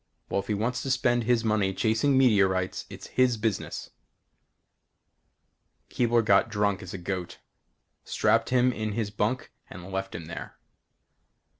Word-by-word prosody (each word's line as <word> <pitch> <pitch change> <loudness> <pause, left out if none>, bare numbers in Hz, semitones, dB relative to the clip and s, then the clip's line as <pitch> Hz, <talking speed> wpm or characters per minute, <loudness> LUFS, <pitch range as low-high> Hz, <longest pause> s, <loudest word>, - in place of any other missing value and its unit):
Well, - - 0
if 100 - -6
he 105 - 0
wants 115 +5 -1
to 135 - -4
spend 120 -2 +2
his 120 -1 +2
money 105 -4 +1
chasing 115 +6 +2
meteorites 95 -7 +2
it's - - -10
his 125 -2 +2
business. 105 -3 -3 2.0
Keebler 120 -2 +2
got 100 +2 +4
drunk 105 -2 0
as 95 -1 -7
a - - -4
goat. 90 0 -5 0.7
Strapped 115 0 +1
him 125 0 +3
in 110 -2 -3
his 105 -2 -2
bunk 110 +5 -2 0.2
and 90 +2 -10
left 95 0 -4
him 85 - -6
there. 85 +1 -8
110 Hz, 145 wpm, -27 LUFS, 95-120 Hz, 2.0 s, got